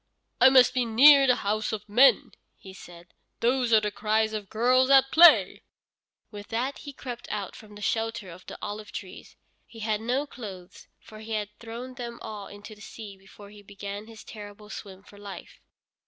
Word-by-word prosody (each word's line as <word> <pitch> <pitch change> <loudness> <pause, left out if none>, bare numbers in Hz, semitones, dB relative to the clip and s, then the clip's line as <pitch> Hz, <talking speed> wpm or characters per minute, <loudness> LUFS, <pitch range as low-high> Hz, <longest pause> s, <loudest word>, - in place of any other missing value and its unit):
"I - - +8
must 255 -1 +5
be 255 -1 +1
near 270 +5 +6
the 250 - +4
houses 215 +1 -2
of 210 -1 -6
men," 245 +7 +4 0.3
he 190 - -13
said; 175 -2 -14 0.3
"those 245 0 +1
are 220 - +6
the 210 0 -2
cries 220 +1 0
of 210 -3 -6
girls 255 +4 +2
at 270 -1 +5
play." 345 +2 +6 0.7
With 205 -1 -10
that 250 +5 -3
he 285 - -9
crept 245 -3 -9
out 205 -3 -5
from 210 -1 -14
the 205 - -10
shelter 225 -2 -2
of 180 +2 -13
the - - -8
olive 210 0 -6
trees. 190 -2 -10 0.3
He 225 - -13
had 215 -1 -1
no 250 +5 -1
clothes, 200 -8 -11
for 215 - -14
he 220 +1 -7
had 210 -1 -2
thrown 235 +3 -8
them 240 -2 -7
all 210 -2 -7
into 205 +2 -12
the 210 - -17
sea 210 -1 -10
before 195 +1 -16
he 210 0 -14
began 200 +1 -8
his 225 -1 -13
terrible 210 0 -11
swim 195 -3 -10
for 205 0 -17
life. 200 -1 -11
215 Hz, 190 wpm, -26 LUFS, 205-240 Hz, 0.7 s, I